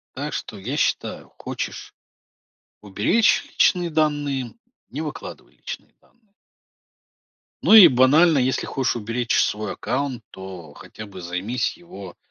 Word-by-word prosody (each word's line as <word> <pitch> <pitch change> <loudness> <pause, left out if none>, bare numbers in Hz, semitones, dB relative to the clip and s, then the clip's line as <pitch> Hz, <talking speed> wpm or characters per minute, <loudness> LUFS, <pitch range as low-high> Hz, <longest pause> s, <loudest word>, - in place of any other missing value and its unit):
Так 145 +3 -4
что, 105 - -6
я 125 +10 -4
считаю, - - -2
хочешь - - -6 0.9
уберечь 105 - +2
личные 175 -2 +2
данные- 145 -5 -1 0.4
не 145 - -5
выкладывай 150 -2 -8
личные - - -9
данные. 220 -4 -33 1.3
Ну, 220 - +6
и 210 -4 +11
банально, 145 +6 +5
если 130 0 0
хочешь 130 -3 -1
уберечь 115 +2 -1
свой 105 -1 -1
аккаунт, 125 -1 -3
то 95 -5 -10
хотя 110 - -11
бы 95 -2 -11
займись 90 +9 -3
его 135 - -11
130 Hz, 120 wpm, -22 LUFS, 105-150 Hz, 1.3 s, и